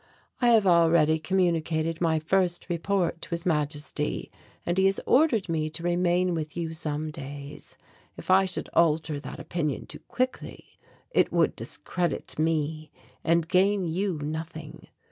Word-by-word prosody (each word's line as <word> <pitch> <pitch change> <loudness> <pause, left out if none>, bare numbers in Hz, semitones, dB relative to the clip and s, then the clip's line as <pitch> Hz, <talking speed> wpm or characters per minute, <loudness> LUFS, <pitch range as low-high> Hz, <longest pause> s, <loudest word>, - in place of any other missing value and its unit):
I 245 - +4
have 225 -3 +5
already 165 -3 +4
communicated 165 -2 0
my 165 -2 +2
first 175 +3 0
report 175 0 0
to - - -7
His 170 0 -3
Majesty 150 -2 -2 0.3
and 175 - 0
he 190 - +5
has 195 - +1
ordered 250 -8 +3
me 155 -2 -1
to 165 +2 -6
remain 175 +1 +2
with 155 -1 -4
you 165 -1 -2
for - - -7
some 155 -1 -3
days. 145 0 -8 0.4
If - - -3
I 190 +1 +6
should 185 - -3
alter 155 -2 +2
that - - -8
opinion 155 -5 -3
too - - -10
quickly 255 +1 -4 0.3
it - - +3
would - - +2
discredit 175 -3 -3
me 155 -1 0 0.3
and 165 0 +2
gain 190 +1 +2
you 180 +1 -1
nothing. 155 0 -6
165 Hz, 150 wpm, -27 LUFS, 155-180 Hz, 0.4 s, I